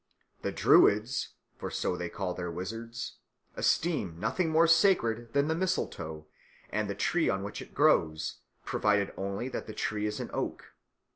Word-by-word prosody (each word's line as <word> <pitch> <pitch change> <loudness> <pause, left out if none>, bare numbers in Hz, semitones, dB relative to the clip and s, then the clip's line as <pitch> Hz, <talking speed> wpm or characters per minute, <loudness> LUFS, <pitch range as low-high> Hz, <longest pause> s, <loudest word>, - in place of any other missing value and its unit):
The - - -2
Druids, 105 +5 +4 0.2
for - - -4
so 90 - -1
they 90 -1 -4
call 95 -1 -3
their 90 -1 -4
wizards, 115 +7 -5 0.4
esteem 120 - 0
nothing 130 - 0
more 160 +1 +5
sacred 160 - +3
than 140 +1 +3
the 160 - +2
mistletoe 85 - -2 0.5
and 105 -1 -1
the 100 - -2
tree 165 - +1
on 95 0 0
which 100 - -5
it - - -12
grows, 80 -1 +2 0.3
provided 105 -1 +1
only 100 +5 -3
that - - -5
the 110 - -6
tree 105 0 -1
is 105 - -3
an - - -5
oak. - - -4
105 Hz, 160 wpm, -30 LUFS, 95-140 Hz, 0.5 s, more